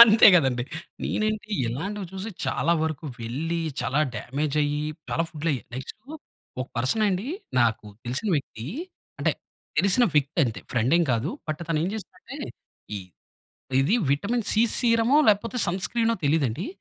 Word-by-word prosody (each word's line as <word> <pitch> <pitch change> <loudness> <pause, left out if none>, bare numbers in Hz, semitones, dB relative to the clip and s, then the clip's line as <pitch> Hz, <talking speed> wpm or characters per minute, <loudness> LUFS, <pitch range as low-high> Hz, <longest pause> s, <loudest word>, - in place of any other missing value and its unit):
అంతే 220 -1 +8
కదండీ. 130 -7 +3 0.4
నేనేంటి 215 0 -1 0.2
ఇలాంటివి 190 - -3
చూసి 195 +3 -5
చాలా 170 - +1
వరకు 160 -1 -2 0.2
వెళ్లి, 155 +9 -2 0.2
చాలా 125 +4 0 0.2
డామేజ్ 140 +4 -2
అయ్యి, 145 0 0 0.3
చాలా 165 - +1
ఫుడ్ 155 0 -6
అయ్యి, 130 -7 -1
నెక్స్టూ 130 0 -7 0.6
ఒక 130 - -2
పర్సన్ 130 - +1
అండి 190 +3 -1 0.3
నాకు 110 -2 +1 0.2
తెలిసిన 130 - -1
వ్యక్తి, 115 -5 -5 0.5
అంటే - - +2 0.5
తెలిసిన 200 +5 +5
వ్యక్తి 145 +1 +1
అంతే. 115 -3 -3
ఫ్రెండ్ 120 +3 +2
ఏం 175 - +4
కాదు. 120 +8 0 0.2
బట్ 155 +1 -2
తనేం 165 +1 +1
చేస్తాడు 195 -4 -9
అంటే 285 - -5 1.3
ఇది 145 +11 +3 0.2
విటమిన్ 215 +11 0
సి 220 - +4 0.2
సీరమో 230 +2 +4
లేకపోతే 215 +4 +2
సన్ 180 +2 -1
స్క్రీనో 230 -1 +1
తెలియదండి. 145 - +1
160 Hz, 145 wpm, -25 LUFS, 135-210 Hz, 1.3 s, అంతే